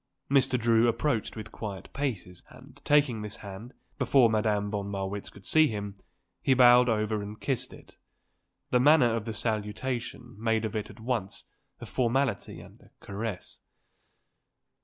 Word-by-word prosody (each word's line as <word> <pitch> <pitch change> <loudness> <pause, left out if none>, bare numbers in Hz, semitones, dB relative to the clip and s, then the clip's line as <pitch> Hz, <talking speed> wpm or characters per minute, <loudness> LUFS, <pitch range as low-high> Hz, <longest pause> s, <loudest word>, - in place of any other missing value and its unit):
Mr. 130 -2 +3
Drew 115 0 +4
approached 115 0 0
with 110 0 -8
quiet 100 -5 -7
paces 110 -11 -4
and, 130 +2 -16
taking 145 -7 +3
this 105 -1 -6
hand, 100 +5 -8 0.3
before 125 -5 +4
Madame 105 -2 0
von 100 -1 -3
Marwitz 100 0 -4
could 100 - -16
see 155 0 +5
him, 105 -4 -4 0.5
he 135 - +3
bowed 125 0 +7
over 110 -1 0
it - - -5
and 105 +1 -10
kissed 125 -2 -2
it. - - -16 0.7
The 125 - +4
manner 130 -4 +5
of 110 -2 -3
the 115 - -4
salutation 115 +3 -3
made 110 0 +1
of 110 - -4
it 105 -1 -3
at - - -13
once 110 -4 -3 0.4
a - - -8
formality 130 -2 -1
and - - -16
a - - -20
caress. 100 -1 -6
115 Hz, 160 wpm, -28 LUFS, 105-125 Hz, 0.7 s, bowed